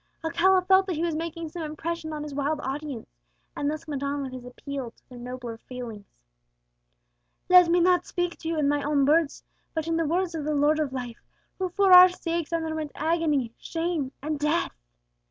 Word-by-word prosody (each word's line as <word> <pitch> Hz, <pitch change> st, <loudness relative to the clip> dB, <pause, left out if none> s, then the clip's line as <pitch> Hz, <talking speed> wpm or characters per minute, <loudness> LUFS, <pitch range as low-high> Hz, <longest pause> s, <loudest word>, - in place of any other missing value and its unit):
Alcala 360 Hz, +3 st, +3 dB
felt 380 Hz, +1 st, +5 dB
that 365 Hz, -, -1 dB
he 320 Hz, -, -2 dB
was 340 Hz, -1 st, 0 dB
making 330 Hz, 0 st, -4 dB
some 340 Hz, +2 st, -7 dB
impression 315 Hz, +1 st, -4 dB
on 300 Hz, -1 st, -4 dB
his 300 Hz, -1 st, -7 dB
wild 290 Hz, +2 st, -1 dB
audience, 275 Hz, -2 st, -5 dB, 0.5 s
and 285 Hz, -, -1 dB
thus 305 Hz, +1 st, -5 dB
went 285 Hz, -3 st, -4 dB
on 280 Hz, 0 st, -2 dB
with 260 Hz, -1 st, -6 dB
his 255 Hz, -1 st, -7 dB
appeal 260 Hz, 0 st, -6 dB
to -, -, -30 dB
their 250 Hz, -1 st, -11 dB
nobler 245 Hz, -2 st, -7 dB
feelings: 235 Hz, -6 st, -8 dB, 1.4 s
"Let 360 Hz, -2 st, +7 dB
me 350 Hz, +1 st, +4 dB
not 360 Hz, 0 st, +3 dB
speak 350 Hz, -1 st, -2 dB
to 320 Hz, -, -7 dB
you 330 Hz, 0 st, -1 dB
in 295 Hz, -2 st, +2 dB
my 290 Hz, 0 st, +1 dB
own 285 Hz, -1 st, +2 dB
words, 305 Hz, +1 st, +2 dB, 0.3 s
but 320 Hz, -1 st, -1 dB
in 330 Hz, 0 st, 0 dB
the 330 Hz, -, +1 dB
words 350 Hz, +2 st, 0 dB
of 320 Hz, -2 st, -3 dB
the 305 Hz, +1 st, -1 dB
Lord 295 Hz, +2 st, +3 dB
of 300 Hz, -3 st, -1 dB
Life, 245 Hz, -3 st, -6 dB, 0.4 s
who 375 Hz, -1 st, -1 dB
for 385 Hz, +1 st, +4 dB
our 365 Hz, 0 st, +11 dB
sakes 340 Hz, -2 st, -3 dB
underwent 315 Hz, -2 st, -2 dB
agony, 305 Hz, -7 st, 0 dB
shame, 325 Hz, -5 st, -2 dB
and 305 Hz, 0 st, -2 dB
death! 300 Hz, +3 st, +1 dB
310 Hz, 200 wpm, -26 LUFS, 280-335 Hz, 1.4 s, our